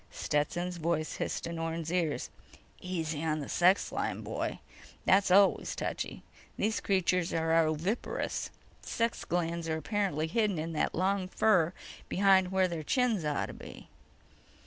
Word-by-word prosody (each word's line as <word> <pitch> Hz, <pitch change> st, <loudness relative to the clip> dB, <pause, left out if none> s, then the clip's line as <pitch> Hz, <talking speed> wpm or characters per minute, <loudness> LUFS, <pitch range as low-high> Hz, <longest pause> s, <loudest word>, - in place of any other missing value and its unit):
Stetson's 175 Hz, +4 st, -1 dB
voice 160 Hz, -1 st, -1 dB
hissed -, -, -3 dB
in 170 Hz, 0 st, -4 dB
Orne's 165 Hz, 0 st, -3 dB
ears: 170 Hz, -5 st, -1 dB, 0.3 s
_"Easy 165 Hz, -4 st, -5 dB
on 155 Hz, -1 st, 0 dB
the 145 Hz, -3 st, -5 dB
sex 185 Hz, +3 st, +3 dB
line, -, -, -2 dB
boy. -, -, -3 dB, 0.5 s
That's 195 Hz, +1 st, +4 dB
always 195 Hz, +2 st, +4 dB
touchy. -, -, -4 dB, 0.3 s
These 215 Hz, +2 st, 0 dB
creatures 180 Hz, -2 st, +1 dB
are 160 Hz, 0 st, +2 dB
oviparous. 165 Hz, +9 st, -2 dB, 0.3 s
Sex 230 Hz, 0 st, -1 dB
glands 170 Hz, -1 st, -1 dB
are 160 Hz, -, 0 dB
apparently 190 Hz, -3 st, -1 dB
hidden 205 Hz, +2 st, +1 dB
in 165 Hz, +1 st, -3 dB
that 155 Hz, -, 0 dB
long 190 Hz, +1 st, +1 dB
fur 185 Hz, -4 st, +3 dB, 0.4 s
behind 190 Hz, -1 st, +4 dB
where 190 Hz, -1 st, +3 dB
their 170 Hz, -3 st, -4 dB
chins 230 Hz, -, +1 dB
ought 150 Hz, -1 st, 0 dB
to -, -, -8 dB
be." -, -, -11 dB
175 Hz, 145 wpm, -31 LUFS, 160-190 Hz, 0.5 s, That's